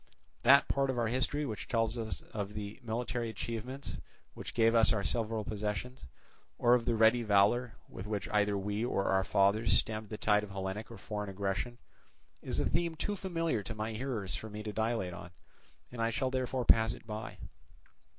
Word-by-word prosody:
That 140 +4 +7
part 135 -1 +1
of 130 - -1
our 115 -2 +1
history 130 +4 0
which 110 -6 -5
tells 115 -1 +1
of 105 -2 -4
the 105 +1 -6
military 120 0 -2
achievements 115 +5 -5 0.3
which - - -8
gave 115 -1 +4
us 115 -1 +5
our 100 -3 +1
several 110 0 -1
possessions, 105 - -4 0.5
or 120 0 +5
of 120 -2 +3
the 120 - +2
ready 115 +2 +5
valour 110 +3 +3
with 95 - -8
which 100 -4 -2
either 105 -1 +2
we 105 +3 -2
or 100 -5 0
our 95 0 +3
fathers 100 +4 +3
stemmed 110 -2 -2
the 110 - -5
tide 105 -1 +3
of 105 - -7
Hellenic 95 +3 -4
or 115 - -9
foreign 105 -1 -4
aggression, 100 +5 -2 0.6
is - - -3
a - - +2
theme 170 0 0
too 205 +6 -2
familiar 165 - -1
to 110 +3 -6
my 110 +1 -3
hearers 110 -5 -3
for 110 - -4
me 105 0 -6
to 105 -1 -4
dilate 110 -5 0
on, 90 +1 -8 0.6
and 120 -1 -5
I 115 - +2
shall 130 +3 -1
therefore 130 -1 -1
pass 110 0 +5
it - - -12
by. 110 0 -6
110 Hz, 190 wpm, -32 LUFS, 105-120 Hz, 0.6 s, That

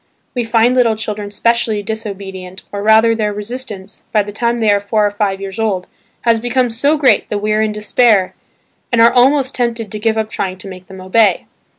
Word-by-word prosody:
We 245 - -1
find 230 +2 +2
little 235 -3 +3
children 210 -2 -5
specially 225 0 0
disobedient, 195 -3 -7
or 200 - -4
rather 220 +2 +5
their 215 -2 -1
resistance, 210 -2 -7
by 210 -2 +2
the 205 - -8
time 235 +3 -1
they 220 -3 +2
are 200 0 +2
four 210 +1 +1
or 205 - 0
five 200 -2 -1
years 195 +1 -7
old, 200 -5 -1 0.4
has 230 -1 +2
become 245 +1 0
so 285 +7 +1
great 280 -3 +2
that 210 - -1
we 210 +1 -2
are 215 - +2
in 215 0 0
despair 210 -2 +2 0.6
and 240 - +2
are 230 +1 +6
almost 265 +2 +3
tempted 230 -4 -2
to 215 - -4
give 220 +1 0
up 220 -1 -1
trying 185 -1 -3
to 185 - -11
make 185 -1 -10
them 190 -1 -11
obey. 190 0 +2
215 Hz, 210 wpm, -16 LUFS, 200-235 Hz, 0.6 s, are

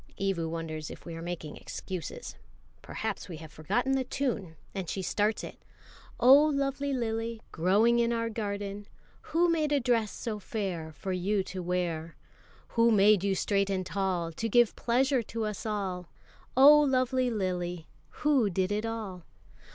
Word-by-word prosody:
Evu 190 -4 0
wonders 160 -2 -5
if - - -11
we 170 - -6
are 165 - -6
making 165 -3 -5
excuses. 190 - -6 0.5
Perhaps 220 -3 -4
we 165 - -6
have 160 -1 -11
forgotten 235 - -1
the 270 -1 +2
tune, 230 -12 -2 0.2
and 190 -4 -4
she 190 - -3
starts 210 +3 0
it: - - -9 0.6
Oh, 275 +4 +8
lovely 280 -1 0
lily, 230 -2 -2
Growing 210 +8 +3
in 235 0 +2
our 230 -1 0
garden, 205 -2 -4 0.4
Who 335 +3 +3
made 315 -3 +1
a 290 - +3
dress 235 -5 +1
so 220 -3 -4
fair 185 -7 -4
For 155 +6 -5
you 190 +2 0
to 185 0 -6
wear? 170 -2 -2 0.5
Who 230 0 +3
made 210 -2 +5
you 195 -1 +1
straight 200 +1 +1
and 190 -1 -1
tall 180 -2 -1
To 225 +8 -3
give 240 0 +4
pleasure 260 +2 +2
to 225 0 -4
us 210 +1 -4
all? 190 -5 -3 0.5
Oh, 290 +3 +9
lovely 255 -2 +2
lily, 180 -5 -2 0.4
Who 275 -8 +4
did 185 +1 0
it 210 +2 -1
all? 215 -5 -5
205 Hz, 160 wpm, -29 LUFS, 180-235 Hz, 0.6 s, Oh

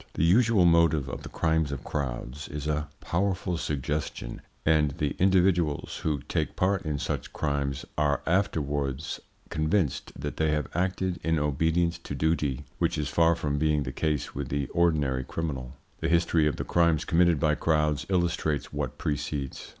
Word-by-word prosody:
The - - +1
usual 110 +1 +5
motive 85 -4 +4
of 60 - -5
the - - -8
crimes 80 -3 +1
of 70 - -5
crowds 65 0 -4
is 75 0 -5
a 75 0 -1
powerful 90 0 0
suggestion, 75 -4 -3 0.2
and 75 -2 +4
the 75 -4 -1
individuals 90 -5 +2
who 75 -3 -1
take - - -1
part 95 +1 +1
in 75 -2 -1
such - - -3
crimes 70 -2 -1
are 75 -1 +1
afterwards 75 -5 -1 0.3
convinced 80 0 0
that 75 +2 -4
they 80 -1 +2
have 75 -3 -1
acted 90 +1 -1
in 80 0 +2
obedience 80 +3 +1
to 70 - -6
duty, 75 -2 0
which - - +1
is 75 -1 -1
far 85 0 +4
from 75 -3 -1
being 75 -1 +2
the 65 - -4
case 75 +2 -1
with 70 -1 -4
the 70 0 -1
ordinary 75 -7 +2
criminal. 65 -3 -4 0.2
The 80 - -1
history 85 -2 +3
of 75 - 0
the - - -3
crimes 85 -3 +2
committed 85 -2 +3
by 75 -1 +3
crowds 75 -1 +1
illustrates 85 -6 0
what - - -3
precedes. 70 -2 -3
75 Hz, 165 wpm, -28 LUFS, 70-85 Hz, 0.3 s, usual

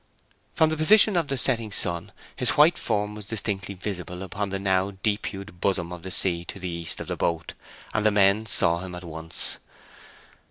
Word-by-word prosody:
From 160 -1 +3
the 155 - -2
position 205 +6 +5
of 170 -4 +1
the 135 - -2
setting 115 -4 0
sun 85 +1 +3 0.2
his 125 -2 +1
white 155 +3 +6
form 105 -2 -1
was 105 -2 -9
distinctly 100 -3 -2
visible 90 -1 -5
upon 100 +1 -4
the 95 - -2
now 95 0 0
deep 105 -1 0
hued 95 -2 -9
bosom 90 -3 -1
of 90 - -8
the 95 - -7
sea 85 -2 +1
to - - -7
the 95 - -5
east 85 -1 -4
of - - -5
the - - -3
boat, 85 -1 -2 0.4
and 110 - 0
the 110 - +5
men 105 +1 +3
saw 85 -3 +4
him 90 0 -7
at 90 - -9
once. 80 -1 -3
100 Hz, 200 wpm, -25 LUFS, 90-110 Hz, 0.4 s, white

